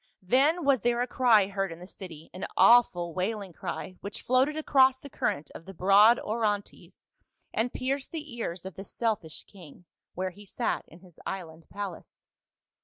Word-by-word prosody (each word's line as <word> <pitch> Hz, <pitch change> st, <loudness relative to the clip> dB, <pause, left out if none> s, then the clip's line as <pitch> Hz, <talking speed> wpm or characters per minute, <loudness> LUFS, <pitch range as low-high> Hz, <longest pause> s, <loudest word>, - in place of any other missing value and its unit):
Then 285 Hz, -, +3 dB
was 275 Hz, -5 st, +4 dB
there 240 Hz, +2 st, +1 dB
a -, -, +2 dB
cry 235 Hz, -6 st, +4 dB
heard 195 Hz, -1 st, -2 dB
in 165 Hz, -, -8 dB
the 175 Hz, -, -11 dB
city, 170 Hz, -4 st, -11 dB
an 185 Hz, -, -5 dB
awful 175 Hz, -8 st, +5 dB
wailing 195 Hz, 0 st, -3 dB
cry 185 Hz, +3 st, -6 dB
which 200 Hz, +1 st, -7 dB
floated 260 Hz, +5 st, +2 dB
across 265 Hz, -4 st, +4 dB
the 280 Hz, +1 st, -12 dB
current 145 Hz, +1 st, -2 dB
of -, -, -10 dB
the 195 Hz, -, -10 dB
broad 200 Hz, +6 st, +6 dB
Orontes 210 Hz, -2 st, -3 dB, 0.5 s
and 235 Hz, +2 st, 0 dB
pierced 265 Hz, +1 st, -2 dB
the 305 Hz, -6 st, -6 dB
ears 185 Hz, -6 st, -4 dB
of 190 Hz, -, -6 dB
the 190 Hz, -, -8 dB
selfish 205 Hz, -7 st, -3 dB
king, 175 Hz, -3 st, -15 dB, 0.3 s
where 185 Hz, +1 st, -2 dB
he 205 Hz, +3 st, -14 dB
sat 200 Hz, -, -2 dB
in 170 Hz, -, -16 dB
his 180 Hz, -4 st, -18 dB
island 165 Hz, -4 st, -7 dB
palace. 200 Hz, -4 st, -8 dB
200 Hz, 175 wpm, -28 LUFS, 180-245 Hz, 0.5 s, broad